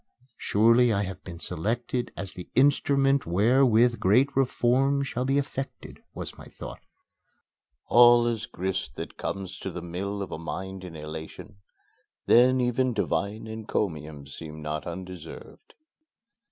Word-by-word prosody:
"Surely, 115 +3 +4
I 100 -1 +1
have 95 -1 -7
been 85 -2 -8
selected 120 +9 -2
as 95 0 -5
the 90 - -9
instrument 140 -1 +3
wherewith 120 +5 +4
great 125 +9 +3
reforms 135 +1 +2
shall 125 0 -2
be 135 +1 +2
effected," 135 -1 -5 0.2
was - - -7
my - - -10
thought. - - -9 1.1
(All 120 0 +7
is 115 -1 -2
grist 95 -4 -3
that - - -7
comes 95 -1 -5
to 95 - -4
the 90 -1 -7
mill 100 +4 -4
of - - -8
a - - -5
mind 95 +3 -6
in 90 -3 -9
elation 80 +6 -8 0.7
then 125 +2 +5
even 125 +1 +1
divine 105 +3 -1
encomiums 80 -10 -4
seem 80 -1 -8
not 75 -1 -4
undeserved.) 90 -1 -9
105 Hz, 135 wpm, -27 LUFS, 90-125 Hz, 1.1 s, All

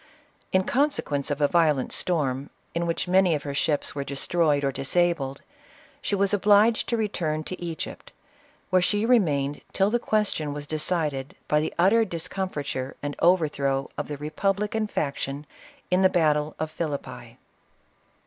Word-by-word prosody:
In 190 0 +3
consequence 245 - 0
of 145 0 -2
a 145 - +5
violent 150 -5 +2
storm, 140 -6 0 0.2
in 170 0 -1
which 165 +2 -1
many 185 -2 +4
of 145 - -4
her 140 - -4
ships 145 +1 0
were 140 - -3
destroyed 145 +1 +1
or 135 - +1
disabled, 140 -1 0 0.6
she 205 - -1
was 200 +1 +2
obliged 210 +3 +4
to 235 - +1
return 165 -8 -1
to 180 +2 -7
Egypt, 165 -2 -6 0.6
where 185 0 +5
she 205 +4 +1
remained 150 - +2
till 195 +1 +2
the 240 - +2
question 210 -10 0
was 145 0 -5
de 155 +1 -3
cided 150 -5 -1
by 150 - +3
the 155 - -1
utter 200 +7 +5
discomfiture 165 -8 -4
and 145 0 -3
overthrow 145 -6 +2
of - - -4
the 145 - -5
republican 200 +8 -1
faction 140 -4 -3 0.5
in 180 +1 +4
the 190 - +6
battle 155 -4 +1
of 155 0 -3
Philippi. 155 -3 -5
160 Hz, 155 wpm, -26 LUFS, 145-190 Hz, 0.6 s, the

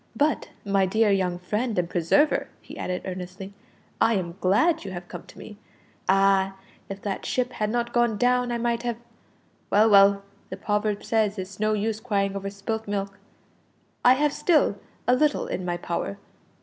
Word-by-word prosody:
"But, 295 +4 +1 0.2
my 195 -1 +2
dear 220 +2 +3
young 185 -3 +1
friend 210 +5 -2
and 175 -1 +1
preserver," 175 - +2
he - - -12
added 180 0 -4
earnestly, 185 +1 -7 0.5
"I 230 - +4
am 175 -3 -3
glad 310 - +3
you 195 - -6
have 175 -1 -7
come 175 - -9
to - - -15
me. 210 -1 -11 0.5
Ah! 195 0 +3 0.3
if 195 0 -7
that 200 -2 -3
ship 250 0 -1
had 210 -3 -2
not 235 +1 -2
gone 240 -3 +2
down 250 +1 +2
I 240 - 0
might 235 0 -1
have 240 -1 -2 0.7
well, 215 +2 +5
well, 200 0 +6 0.3
the - - -6
proverb 210 0 -1
says 215 -2 +1
it's 190 0 -6
of - - -26
no 215 0 +2
use 215 +1 -1
crying 200 -3 -1
over 195 0 -3
spilt 210 +2 -4
milk. 200 -1 -3 0.8
I 250 - +7
have 295 +1 +1
still 300 - +2 0.3
a 250 - +5
little 300 +3 +1
in 185 - -4
my 175 -1 -1
power. 170 - -3
205 Hz, 180 wpm, -25 LUFS, 190-235 Hz, 0.8 s, I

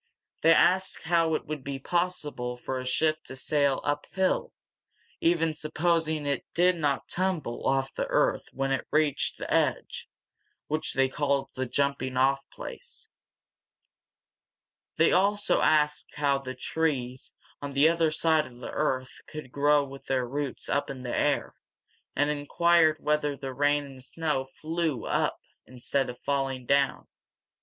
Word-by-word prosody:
They 165 - +6
asked 185 +3 +2
how 165 -1 +2
it - - -3
would 150 -3 -5
be 140 0 -4
possible 145 -6 -2
for 130 +1 -4
a 130 - -5
ship 155 +4 +1
to 130 - -8
sail 140 +1 +2
uphill, 150 +6 -1 0.7
even 165 -1 +2
supposing 155 0 0
it 140 -2 0
did 180 +1 +4
not 145 -4 -1
tumble 180 -9 -2
off 135 0 +1
the - - -2
earth - - +1
when 135 0 -2
it 135 - -1
reached 150 -2 +1
the - - -4
edge, - - 0 0.6
which 155 +1 -1
they 135 0 +4
called 140 0 -1
the 130 0 -3
jumping 140 -1 -1
off 135 +1 +2
place. - - -8 1.9
They 165 - +5
also 205 +3 +2
asked 150 -1 +2
how 140 -2 +1
the 130 -1 -7
trees 130 -2 -2 0.3
on 140 -1 -5
the 140 +3 +5
other 165 -1 +3
side 155 0 +2
of 120 - -15
the 125 - -7
earth 130 -4 -2
could 155 -5 -8
grow 145 +1 +3
with 135 0 -10
their 130 -2 0
roots 140 +1 -3
up 140 - 0
in 130 -2 -7
the 120 - -3
air, - - +1 0.6
and 145 +1 +2
inquired 155 +2 +3
whether 150 -1 0
the 135 -1 -6
rain 145 +2 +2
and 135 -2 -9
snow 150 -2 -1
flew 155 -2 -3
up - - 0 0.3
instead 130 +2 -1
of 125 - -7
falling 135 -2 -1
down. 140 +1 +1
145 Hz, 150 wpm, -28 LUFS, 135-160 Hz, 1.9 s, They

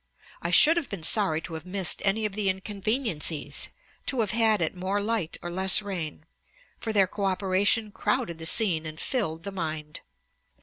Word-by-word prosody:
I - - -3
should 325 +3 +7
have 320 -6 -2
been 195 -6 -7
sorry 165 -3 +2
to 165 - -9
have 160 -1 -7
missed 185 -1 0
any 215 +2 +1
of 210 - -3
the 205 -1 0
inconveniencies, 195 - -1 0.4
to 260 -4 0
have 210 - 0
had 215 -7 +2
more 190 +2 -2
light 205 -5 -2
or 175 - -5
less 190 +3 +3
rain, 170 -6 -5 0.5
for 225 - -4
their 200 -3 +4
co 200 +2 -5
operation 195 +3 +1
crowded 215 -8 -2
the 160 - 0
scene 165 -6 +5
and 155 0 -8
filled 165 -11 -3
the 200 - -5
mind.' 155 -4 -5
195 Hz, 175 wpm, -26 LUFS, 165-215 Hz, 0.5 s, should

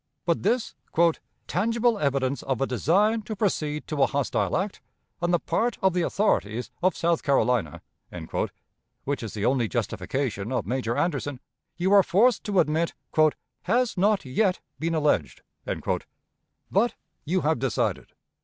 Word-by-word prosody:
But 170 -1 +1
this 230 +4 0 0.7
"tangible 230 +4 +1
evidence 140 -1 0
of 135 -3 -2
a 135 - +2
design 195 - +2
to 215 +1 -6
proceed 155 -7 -1
to 150 -3 -2
a - - +6
hostile 140 -1 0
act, 190 +2 -3 0.4
on 175 - +1
the 175 - +4
part 230 +7 -1
of 190 -2 +3
the 180 - +1
authorities 125 - 0
of 185 0 +2
South 170 -1 +1
Carolina" 125 - +1 1.2
(which 140 +1 -2
is 110 -3 -6
the 105 0 -1
only 125 -3 +2
justification 110 0 -2
of 125 - -1
Major 120 -2 -1
Anderson), 145 -6 -1 0.4
you 185 +3 +2
are 200 - +8
forced 205 +5 +3
to 200 -3 +2
admit 160 +2 +1 0.7
"has 245 0 +2
not 200 0 +2
yet 180 +9 +1 0.2
been 165 +1 -1
alleged." 150 -2 0 0.2
But 225 +5 -3 0.3
you 180 +4 0
have 155 -3 +1
decided. 130 -3 -1
160 Hz, 145 wpm, -26 LUFS, 130-200 Hz, 1.2 s, are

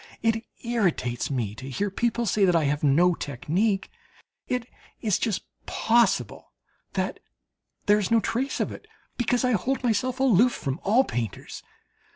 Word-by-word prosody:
It 225 0 +1 0.2
irritates 185 - 0
me 120 -7 -2
to 130 +5 -8
hear 200 +10 -2
people 235 +3 0
say 205 0 +2
that 180 -2 +3
I 165 - +3
have 145 +1 0
no 165 +6 +4
"technique." 180 - -1 0.6
It 250 -2 -1 0.3
is 210 -5 +1
just 215 -5 -1 0.2
possible 235 +1 +1 0.4
that - - -2 0.7
there 205 0 +5
is 200 - -1
no 230 - +5
trace 250 +6 -2
of - - -1
it, - - -10 0.3
because 245 +1 +1
I 250 - +2
hold 255 +6 0
myself 250 +2 0
aloof 245 -2 +4
from 135 +1 -3
all 225 +7 +4
painters. 115 - -5
210 Hz, 155 wpm, -26 LUFS, 155-235 Hz, 0.7 s, there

